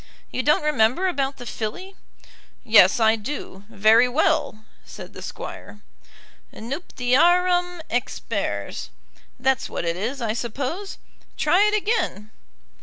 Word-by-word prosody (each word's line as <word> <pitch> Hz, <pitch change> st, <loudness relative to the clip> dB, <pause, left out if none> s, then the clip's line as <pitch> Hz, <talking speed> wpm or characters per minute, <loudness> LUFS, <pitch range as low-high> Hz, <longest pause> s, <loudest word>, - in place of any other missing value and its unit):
"You -, -, -1 dB
don't 300 Hz, +3 st, +2 dB
remember 300 Hz, +4 st, +2 dB
about 280 Hz, -6 st, -1 dB
the 245 Hz, -, -9 dB
filly?" 300 Hz, -, -5 dB, 0.7 s
"Yes 215 Hz, -4 st, +6 dB
I 220 Hz, 0 st, +4 dB
do; 210 Hz, -4 st, -7 dB
very 225 Hz, +3 st, +4 dB
well," 250 Hz, -4 st, 0 dB, 0.2 s
said -, -, -11 dB
the -, -, -10 dB
Squire. 210 Hz, -, -8 dB, 0.7 s
"'Nuptiarum 350 Hz, +7 st, +1 dB
expers.' 245 Hz, +1 st, -3 dB, 0.5 s
That's 265 Hz, 0 st, 0 dB
what -, -, -4 dB
it 170 Hz, 0 st, -1 dB
is, 235 Hz, +9 st, -3 dB
I 225 Hz, -3 st, -1 dB
suppose. 265 Hz, -, -4 dB, 0.4 s
Try 395 Hz, +4 st, +4 dB
it 420 Hz, -, +1 dB
again." 400 Hz, -, -1 dB
255 Hz, 115 wpm, -23 LUFS, 220-345 Hz, 0.7 s, Yes